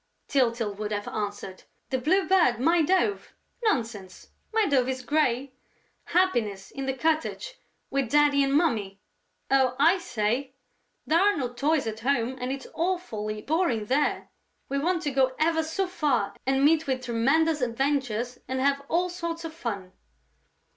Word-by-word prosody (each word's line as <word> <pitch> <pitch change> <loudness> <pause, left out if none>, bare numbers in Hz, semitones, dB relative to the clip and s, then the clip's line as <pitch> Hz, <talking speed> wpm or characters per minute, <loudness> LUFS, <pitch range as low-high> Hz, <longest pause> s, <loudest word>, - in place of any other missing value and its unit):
Tyltyl 235 -6 +1
would 210 0 -4
have 205 -1 -3
answered. 205 -2 -5 0.3
"The 260 - +1
Blue 370 +9 +2
Bird, 340 -11 +3
my 330 +6 +3
dove? 380 +5 0 0.3
Nonsense: 225 - -2 0.2
my 445 -1 +2
dove 265 -6 +2
is 260 -1 -3
grey!... 270 -2 0 0.5
Happiness, 230 - 0
in 270 -1 -5
the 265 - 0
cottage? 320 - -1 0.3
With 275 -3 0
Daddy 290 0 +4
and 275 - 0
Mummy? 225 - +1 0.5
Oh, 265 -2 +3
I 340 +6 +5
say! 260 -3 -2 0.5
There 325 +2 +3
are 410 +1 +3
no 250 -4 -3
toys 290 +2 +1
at 220 0 -4
home 250 0 0
and 250 +1 -2
it's 275 0 -5
awfully 225 - -2
boring 295 - 0
there: 270 +7 0 0.4
we 275 - 0
want 345 +3 0
to 290 - -1
go 260 -1 +2
ever 320 +1 +2
so 325 +5 -1
far 300 - 0
and 270 +1 +3
meet 320 0 +3
with 260 -1 -1
tremendous 285 +7 +2
adventures 250 -1 -1
and 260 0 -2
have 280 +1 +2
all 355 +2 +2
sorts 335 -2 -5
of 320 - -6
fun...." 200 - -5
275 Hz, 155 wpm, -26 LUFS, 235-325 Hz, 0.5 s, I